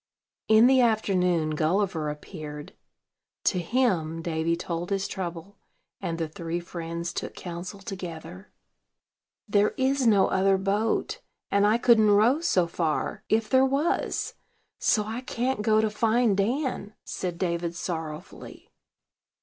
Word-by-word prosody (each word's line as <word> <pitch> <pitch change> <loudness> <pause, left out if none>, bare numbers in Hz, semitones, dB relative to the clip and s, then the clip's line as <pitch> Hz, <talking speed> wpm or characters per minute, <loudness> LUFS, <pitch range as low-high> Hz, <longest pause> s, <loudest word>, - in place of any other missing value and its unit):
In 220 +1 +6
the 260 0 +5
afternoon 180 -8 +2
Gulliver 160 0 0
appeared: 150 -1 -8 0.7
to 180 - +2
him 170 -6 0
Davy 165 0 0
told 170 0 -4
his 195 -1 -1
trouble, 180 +2 -6 0.4
and 170 -4 -3
the 165 -1 -2
three 165 +2 -4
friends 170 0 -5
took - - -5
counsel 180 +3 -7
together. 185 -2 -8 1.0
"There 205 0 +2
is 265 -1 +2
no 200 -4 +5
other 195 0 +3
boat; 200 +3 -1 0.3
and 200 +1 +4
I 215 +2 +4
couldn't 230 -3 +5
row 220 +8 +4
so 190 - +2
far, 165 -2 -2
if 220 0 +2
there 260 +2 +4
was: 275 +5 0 0.5
so 210 - +2
I 225 +3 -4
can't 255 -2 -2
go 215 0 +3
to 220 - +1
find 225 0 +2
Dan," 220 0 -1
said 180 -2 -4
David 170 -1 -2
sorrowfully. 160 -1 -7
195 Hz, 130 wpm, -26 LUFS, 170-220 Hz, 1.0 s, In